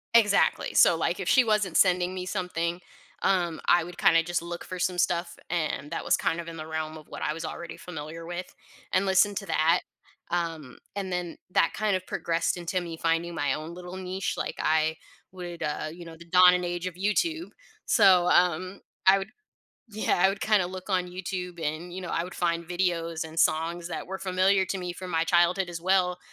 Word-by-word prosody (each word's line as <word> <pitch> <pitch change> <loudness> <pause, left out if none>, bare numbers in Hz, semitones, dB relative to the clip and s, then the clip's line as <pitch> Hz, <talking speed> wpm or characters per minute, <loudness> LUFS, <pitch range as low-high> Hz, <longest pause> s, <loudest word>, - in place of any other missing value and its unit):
Exactly. 210 -3 +4
So, - - +6
like, - - -1
if - - -4
she 260 - +6
wasn't 210 -6 +1
sending 180 -1 +3
me 185 -1 -4
something, 180 -2 -2 0.4
um, 175 -4 +1
I 175 -1 +5
would, 175 +1 -10
kinda, 165 -1 +5
just, 175 0 -1
look 170 0 -6
for 185 -1 -7
some 180 0 0
stuff, 170 0 0
and 155 -3 -2
that - - -4
was, - - +4
kind 165 - -1
of, 170 - -6
in 165 - -7
the 155 - -6
realm 160 0 -4
of 155 - -14
what - - -8
I 150 - 0
was 165 - -6
already 170 - -6
familiar 165 0 -8
with, 175 +1 -6 0.4
and 190 +1 +3
listen 195 +2 +3
to 195 - -4
that, 160 0 +3 0.5
um, 165 -6 -3 0.2
and 190 -2 -3
then 175 -1 -3
that, 165 - +3
kind 215 -3 +1
of 185 - -12
progressed 165 +1 -1
into 175 +1 -2
me 170 -2 -6
finding 165 +1 0
my 145 -2 0
own 155 +3 -5
little 180 +1 -8
niche, 185 +1 -3
like - - -3
I 160 0 +2 0.4
would, 175 -2 -8
uh 150 +1 -2
you 170 0 -10
know, 165 -1 -10
the 170 - -13
dawn 180 +1 +7
and 180 0 0
age 175 +1 -3
of 180 - -6
YouTube. 320 - 0 0.4
So, 185 -5 +5
um, 180 +2 +2 0.3
I 195 +1 +8
would, 195 +2 -6 0.6
yeah, 215 -4 0
I - - +8
would, 195 +1 -3
kinda, 210 -4 +3
look 185 +2 -8
on 180 -1 +1
YouTube 180 -1 -5
and, 160 +4 -3
you 190 - -5
know, 180 - -6
I 165 - 0
would 180 - -9
find 170 -1 -1
videos 170 -2 -1
and 160 +1 -7
songs 165 +2 +1
that - - -5
were 190 +1 -5
familiar 190 +1 +2
to 190 - -3
me 180 -1 -4
from 185 +1 -8
my 160 - +2
childhood 175 +2 +3
as 170 -1 -6
well, 180 -1 +2
175 Hz, 210 wpm, -27 LUFS, 165-185 Hz, 0.6 s, I